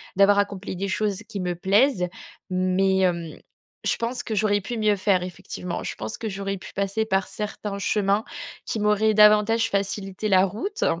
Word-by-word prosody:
d'avoir 200 Hz, +1 st, +5 dB
accompli 200 Hz, -1 st, -2 dB
des 200 Hz, +2 st, -2 dB
choses 205 Hz, +1 st, -1 dB
qui 205 Hz, -3 st, -5 dB
me 180 Hz, -1 st, -2 dB
plaisent. 195 Hz, +2 st, +3 dB, 0.4 s
Mais, 185 Hz, +1 st, +2 dB
hem, 170 Hz, -4 st, 0 dB, 0.5 s
je -, -, +2 dB
pense 240 Hz, +2 st, -3 dB
que 220 Hz, -, -4 dB
j'aurais 205 Hz, 0 st, +2 dB
pu 235 Hz, +4 st, -5 dB
mieux 215 Hz, -1 st, +3 dB
faire 190 Hz, -2 st, +2 dB
effectivement. 180 Hz, 0 st, -6 dB
Je -, -, -4 dB
pense 110 Hz, +1 st, -6 dB
que 220 Hz, -, -4 dB
j'aurais 195 Hz, 0 st, -3 dB
pu -, -, -11 dB
passer 200 Hz, +3 st, -1 dB
par 195 Hz, -3 st, 0 dB
certains 210 Hz, -1 st, -5 dB
chemins 200 Hz, +1 st, +1 dB, 0.4 s
qui 220 Hz, -, -3 dB
m'auraient 210 Hz, +1 st, +3 dB
davantage 215 Hz, +2 st, +5 dB
facilité 200 Hz, +1 st, -2 dB
la 190 Hz, -1 st, +5 dB
route. 320 Hz, -, -3 dB
200 Hz, 175 wpm, -24 LUFS, 190-215 Hz, 0.5 s, d'avoir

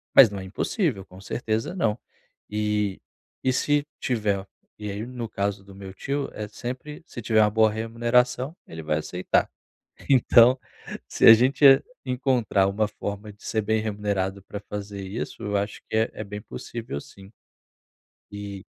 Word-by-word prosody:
Mas 130 Hz, -5 st, +10 dB
não 100 Hz, -1 st, -6 dB
é -, -, -6 dB
impossível, 105 Hz, -, -1 dB
com 95 Hz, -1 st, -14 dB
certeza, 110 Hz, -, -2 dB
não. 115 Hz, -, 0 dB, 0.5 s
E 105 Hz, -2 st, -1 dB, 0.4 s
e 130 Hz, -, +3 dB
se 145 Hz, +3 st, +1 dB
tiver 105 Hz, -5 st, 0 dB, 0.3 s
e 105 Hz, -1 st, -4 dB
aí, 105 Hz, +3 st, -4 dB
no 120 Hz, -2 st, -6 dB
caso 100 Hz, -1 st, -2 dB
do 100 Hz, 0 st, -14 dB
meu 95 Hz, -1 st, -9 dB
tio, 140 Hz, +7 st, -3 dB
é 105 Hz, -, -5 dB
sempre 130 Hz, +8 st, -7 dB
se 120 Hz, -, -8 dB
tiver 110 Hz, -1 st, +3 dB
uma 105 Hz, -, +5 dB
boa 110 Hz, 0 st, +4 dB
remuneração, 120 Hz, +5 st, +1 dB
ele 80 Hz, 0 st, -7 dB
vai 75 Hz, 0 st, 0 dB
aceitar. 90 Hz, +3 st, 0 dB, 0.6 s
Então, 125 Hz, -1 st, +6 dB, 0.5 s
se -, -, +2 dB
a 115 Hz, -, +13 dB
gente, 130 Hz, +6 st, +2 dB
eh 135 Hz, -1 st, +8 dB, 0.2 s
encontrar 125 Hz, -7 st, +2 dB
uma 105 Hz, +2 st, +1 dB
forma 105 Hz, 0 st, -6 dB
de 100 Hz, -, -23 dB
ser 110 Hz, -1 st, 0 dB
bem 110 Hz, +1 st, +1 dB
remunerado 100 Hz, -2 st, -2 dB
pra 100 Hz, +1 st, -7 dB
fazer 100 Hz, -1 st, -5 dB
isso, 95 Hz, +4 st, -5 dB
eu 105 Hz, 0 st, -1 dB
acho 100 Hz, +1 st, -2 dB
que -, -, -2 dB
é 110 Hz, +1 st, +2 dB
é 110 Hz, -, -5 dB
bem 105 Hz, +1 st, -7 dB
possível 115 Hz, -7 st, -6 dB
sim. 95 Hz, +5 st, -14 dB, 1.0 s
Eh 100 Hz, -1 st, -7 dB
105 Hz, 165 wpm, -25 LUFS, 100-120 Hz, 1.0 s, a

